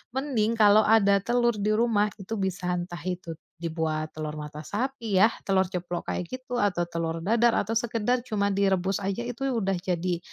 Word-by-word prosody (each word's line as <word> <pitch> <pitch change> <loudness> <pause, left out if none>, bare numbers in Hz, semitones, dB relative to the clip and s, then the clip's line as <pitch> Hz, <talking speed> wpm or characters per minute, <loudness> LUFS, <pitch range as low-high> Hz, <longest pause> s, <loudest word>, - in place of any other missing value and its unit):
mending 240 -5 0
kalau 210 0 +7
ada 200 -2 +5
telur 240 0 +2
di 210 +1 +1
rumah 220 -2 +2
itu 195 +3 -5
bisa, 185 -1 -2
entah 175 0 -4
itu 180 -2 -4 0.2
dibuat 160 -2 -2
telur 155 -1 -5
mata 150 0 -7
sapi 230 -2 -2
ya, 220 +3 +6 0.2
telur 190 -1 +4
ceplok, 175 -2 -4
kayak 180 - -3
gitu, 255 +2 -5
atau 190 -4 +1
telur 165 -1 -3
dadar, 230 +3 +3
atau 205 - -5
sekedar 235 +1 0
cuma 200 -2 0
direbus 195 -1 +1
aja, 200 +4 -2
itu 245 +3 -3
udah 215 -7 0
jadi, 180 -1 -1
200 Hz, 175 wpm, -27 LUFS, 175-225 Hz, 0.2 s, kalau